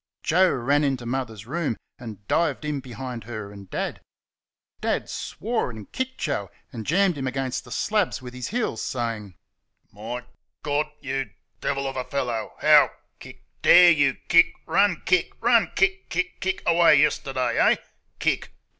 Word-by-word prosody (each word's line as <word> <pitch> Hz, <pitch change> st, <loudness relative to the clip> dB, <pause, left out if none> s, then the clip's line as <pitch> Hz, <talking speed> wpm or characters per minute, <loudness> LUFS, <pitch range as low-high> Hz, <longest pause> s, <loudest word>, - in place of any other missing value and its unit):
Joe 185 Hz, +3 st, +4 dB
ran 140 Hz, +4 st, +1 dB
into 135 Hz, -4 st, -1 dB
Mother's 115 Hz, -4 st, -4 dB
room 150 Hz, -2 st, -2 dB, 0.2 s
and 110 Hz, -4 st, -10 dB
dived 155 Hz, -3 st, +1 dB
in 150 Hz, -2 st, -2 dB
behind 125 Hz, -3 st, -7 dB
her 110 Hz, -3 st, -6 dB
and 100 Hz, -2 st, -12 dB
Dad. -, -, -3 dB, 0.8 s
Dad -, -, -1 dB
swore, 225 Hz, -, -3 dB
and 110 Hz, -4 st, -10 dB
kicked 260 Hz, 0 st, -3 dB
Joe 105 Hz, -, -2 dB, 0.2 s
and 115 Hz, -3 st, -7 dB
jammed 180 Hz, -1 st, +2 dB
him 130 Hz, -, -2 dB
against 130 Hz, 0 st, -3 dB
the -, -, -13 dB
slabs 215 Hz, 0 st, 0 dB
with 125 Hz, -2 st, -10 dB
his 125 Hz, -1 st, -5 dB
heels, 220 Hz, -, -2 dB
saying: 115 Hz, -6 st, -4 dB, 0.6 s
"My 115 Hz, +4 st, -6 dB, 0.4 s
GAWD! 150 Hz, +1 st, 0 dB
You 135 Hz, -3 st, -3 dB, 0.3 s
DEVIL 140 Hz, -1 st, -1 dB
of 135 Hz, -, -5 dB
a 130 Hz, -, -1 dB
feller, 120 Hz, -5 st, -2 dB
how -, -, +7 dB, 0.3 s
(KICK) -, -, -13 dB, 0.2 s
dare 180 Hz, -1 st, +8 dB
you 140 Hz, -5 st, +3 dB
(KICK) 170 Hz, 0 st, +5 dB
run 200 Hz, -5 st, +2 dB
(KICK) 185 Hz, -2 st, +2 dB
run 235 Hz, -1 st, +4 dB
(KICK, 195 Hz, 0 st, +1 dB
KICK, 180 Hz, +1 st, -2 dB
KICK) 190 Hz, 0 st, -2 dB
away 170 Hz, -2 st, +6 dB
yesterday, 135 Hz, -3 st, +1 dB
eh?" -, -, +5 dB, 0.4 s
(KICK). -, -, 0 dB
135 Hz, 155 wpm, -24 LUFS, 120-170 Hz, 0.8 s, dare